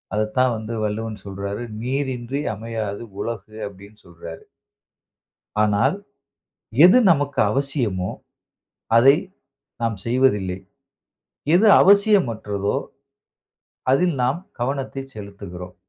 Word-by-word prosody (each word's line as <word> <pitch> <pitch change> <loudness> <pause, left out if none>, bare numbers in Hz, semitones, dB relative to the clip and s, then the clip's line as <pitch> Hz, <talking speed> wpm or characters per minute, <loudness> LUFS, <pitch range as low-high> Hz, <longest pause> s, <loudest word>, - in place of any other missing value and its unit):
அதத்தான் 115 +4 +1
வந்து 110 +1 -5
வள்ளுவன் 105 -1 -3
சொல்றாரு. 100 +3 -5 0.2
"நீரின்றி 130 +1 -2
அமையாது 110 -1 -5 0.2
உலகு" 110 -1 -6
அப்படின்னு 100 +2 -14
சொல்றாரு. 85 -1 -10 1.2
ஆனால், 105 - +2 0.9
எது 190 +8 +7
நமக்கு 145 -2 0
அவசியமோ! 125 -10 -1 0.9
அதை 135 +4 +7 0.7
நாம் 115 -2 0
செய்வதில்லை. 105 -7 +1 1.0
எது 215 +3 +5
அவசியமற்றதோ! 130 - +3 1.2
அதில் 175 +3 +2
நாம் 135 +8 0 0.2
கவனத்தை 135 +1 -2
செலுத்துகிறோம். 100 -3 -9
115 Hz, 85 wpm, -22 LUFS, 100-135 Hz, 1.2 s, எது